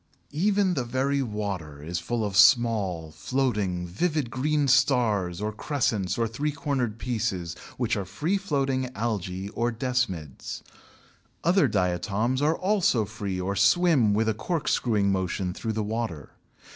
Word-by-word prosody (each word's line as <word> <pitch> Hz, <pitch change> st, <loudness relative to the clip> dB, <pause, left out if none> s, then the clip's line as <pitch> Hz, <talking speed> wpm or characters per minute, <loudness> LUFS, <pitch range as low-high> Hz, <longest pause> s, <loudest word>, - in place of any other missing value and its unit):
Even 195 Hz, +3 st, +2 dB
the 135 Hz, -7 st, -1 dB
very 135 Hz, +3 st, 0 dB
water 100 Hz, -, -4 dB
is 85 Hz, +2 st, -3 dB
full 120 Hz, -2 st, -2 dB
of 100 Hz, -2 st, -3 dB
small, 105 Hz, -7 st, +4 dB
floating, 100 Hz, -, -1 dB
vivid 145 Hz, -, -1 dB
green 145 Hz, +3 st, +1 dB
stars 120 Hz, -, +2 dB
or 105 Hz, +1 st, -2 dB
crescents 110 Hz, -, -1 dB
or 115 Hz, -1 st, +1 dB
three 140 Hz, +7 st, -2 dB
cornered 130 Hz, -6 st, -2 dB
pieces 105 Hz, -8 st, -2 dB, 0.2 s
which 120 Hz, -1 st, 0 dB
are 100 Hz, -, -2 dB
free 125 Hz, -, -1 dB
floating 135 Hz, -9 st, 0 dB
Algæ 100 Hz, -4 st, -3 dB
or 120 Hz, +1 st, 0 dB
Desmids. 115 Hz, -, -3 dB, 0.8 s
Other 180 Hz, +4 st, +4 dB
diatoms 100 Hz, +7 st, 0 dB
are 155 Hz, +2 st, +2 dB
also 185 Hz, -, +2 dB
free 100 Hz, -3 st, -4 dB
or 95 Hz, +2 st, -2 dB
swim 115 Hz, -, +4 dB
with 110 Hz, +1 st, +1 dB
a 110 Hz, -, +2 dB
cork 145 Hz, +10 st, -3 dB
screwing 105 Hz, -5 st, +2 dB
motion 95 Hz, -1 st, -1 dB
through 110 Hz, +3 st, -3 dB
the 110 Hz, 0 st, -1 dB
water. 105 Hz, -, -4 dB
110 Hz, 145 wpm, -26 LUFS, 95-135 Hz, 0.8 s, small